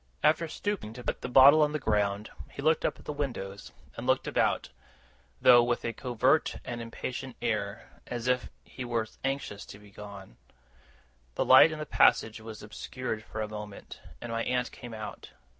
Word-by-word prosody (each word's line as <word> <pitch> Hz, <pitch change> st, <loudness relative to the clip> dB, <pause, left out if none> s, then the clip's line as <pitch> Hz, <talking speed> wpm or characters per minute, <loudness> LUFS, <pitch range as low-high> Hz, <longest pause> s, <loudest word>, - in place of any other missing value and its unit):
After 155 Hz, +2 st, +3 dB
stooping 185 Hz, -, -4 dB
to 125 Hz, +1 st, -9 dB
put -, -, -3 dB
the -, -, -4 dB
bottle 135 Hz, +4 st, +8 dB
on 150 Hz, 0 st, +2 dB
the 155 Hz, -, -1 dB
ground, 105 Hz, -3 st, 0 dB, 0.2 s
he 140 Hz, -, -8 dB
looked 160 Hz, +1 st, +3 dB
up -, -, 0 dB
at -, -, -17 dB
the 150 Hz, -, -3 dB
windows, 120 Hz, -9 st, -5 dB, 0.2 s
and -, -, -6 dB
looked -, -, +2 dB
about; -, -, +1 dB, 0.7 s
though 120 Hz, -1 st, +8 dB
with 120 Hz, 0 st, -1 dB
a 115 Hz, -, -2 dB
covert 125 Hz, +6 st, +1 dB
and 120 Hz, -1 st, -5 dB
impatient 125 Hz, +2 st, -6 dB
air, 105 Hz, -3 st, -2 dB, 0.2 s
as 120 Hz, 0 st, -4 dB
if 125 Hz, -1 st, +1 dB
he 130 Hz, -, -8 dB
was 115 Hz, -2 st, -3 dB
anxious 135 Hz, -7 st, -3 dB
to -, -, -10 dB
be 105 Hz, -1 st, -17 dB
gone. 100 Hz, -8 st, -11 dB, 1.0 s
The -, -, 0 dB
light 130 Hz, +5 st, +8 dB
in 155 Hz, -, -5 dB
the 150 Hz, -, -4 dB
passage 110 Hz, -6 st, +3 dB
was 110 Hz, -1 st, -9 dB
obscured 110 Hz, +1 st, -5 dB
for 110 Hz, -, -6 dB
a 110 Hz, -, -2 dB
moment, 105 Hz, -1 st, -9 dB, 0.2 s
and 120 Hz, -, -6 dB
my 115 Hz, 0 st, -1 dB
aunt 125 Hz, -1 st, -1 dB
came 120 Hz, -3 st, -9 dB
out. 105 Hz, -2 st, -8 dB
120 Hz, 185 wpm, -29 LUFS, 105-135 Hz, 1.0 s, bottle